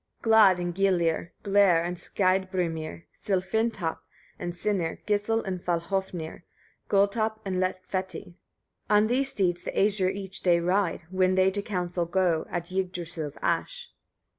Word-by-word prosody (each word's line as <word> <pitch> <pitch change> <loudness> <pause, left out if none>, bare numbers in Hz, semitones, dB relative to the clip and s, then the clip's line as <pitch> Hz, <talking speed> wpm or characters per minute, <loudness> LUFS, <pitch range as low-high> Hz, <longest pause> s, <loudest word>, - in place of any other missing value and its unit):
30. - - -34
Glad 210 -5 +7
and 175 0 -2
Gyllir, 175 -4 +1
Gler 195 -4 +4
and 175 +1 -3
Skeidbrimir, 180 -4 -1
Sillfrintopp 190 -2 -1 0.4
and 175 0 -4
Sinir, 180 -4 -1
Gisl 210 +2 +1
and 185 -2 -4
Falhôfnir, 175 -1 -2 0.5
Gulltopp 215 +2 +2
and 190 -1 -2
Lettfeti; 185 -1 -3 0.6
on 210 0 +5
these 260 +4 +1
steeds 180 -7 0
the - - -5
Æsir 200 -2 +2
each 190 -1 -6
day 175 -2 +4
ride, 180 0 0
when 185 0 +2
they 190 0 +4
to 205 +1 -2
council 180 -4 -2
go, 175 -2 +1
at 175 0 -4
Yggdrasil's 175 -5 -3
ash. 485 -1 -1
185 Hz, 135 wpm, -27 LUFS, 175-200 Hz, 0.6 s, Glad